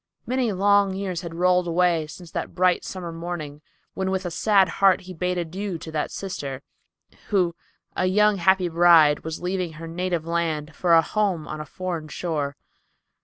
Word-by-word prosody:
Many 250 -2 0
long 200 0 +3
years 190 -3 -3
had 170 -2 -7
rolled 180 +1 +2
away 170 -2 +2
since 170 +2 -11
that - - -5
bright 180 -1 +2
summer 180 -3 -6
morning, 165 -3 -6 0.3
when 190 0 -2
with 190 0 -2
a 175 - -3
sad 195 +2 +3
heart 195 +2 +3
he 185 0 -9
bade 180 +1 -2
adieu 180 +2 -3
to 160 - -9
that 155 -1 -2
sister, 140 -8 -5 0.6
who, 180 -5 +1 0.4
a 185 - +1
young 210 +2 +3
happy 185 +1 +3
bride, 165 -3 +5
was 160 +2 -6
leaving 180 -2 -2
her 160 +2 -9
native 175 -1 -2
land 165 -2 -2
for 175 -2 +3
a 165 - +6
home 190 -5 -1
on 155 0 -5
a 150 - -8
foreign 175 -2 -5
shore. 150 -4 -3
175 Hz, 175 wpm, -24 LUFS, 165-190 Hz, 0.6 s, a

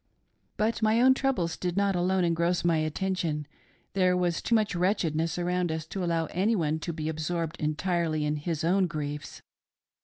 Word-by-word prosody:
" - - -45
But 225 +2 0
my 220 +1 +3
own 260 +2 +6
troubles 255 -12 0
did 180 0 -3
not 200 -1 +2
alone 180 +1 +1
engross 170 +1 +1
my 170 -2 +3
attention; 155 -1 -1 0.5
there 185 -2 +3
was 175 -2 0
too 235 - +1
much»wretchedness 180 -6 +1
around 180 -1 0
us 160 -1 -3
to 190 +3 -4
allow 165 -1 +1
anyone 175 -5 +1
to 170 - -4
be 155 -1 -4
absorbed 160 +1 -2
entirely 155 0 0
in 150 0 0
his 155 +1 -3
own 185 +3 +3
griefs. 150 -2 -5
175 Hz, 165 wpm, -28 LUFS, 160-190 Hz, 0.5 s, own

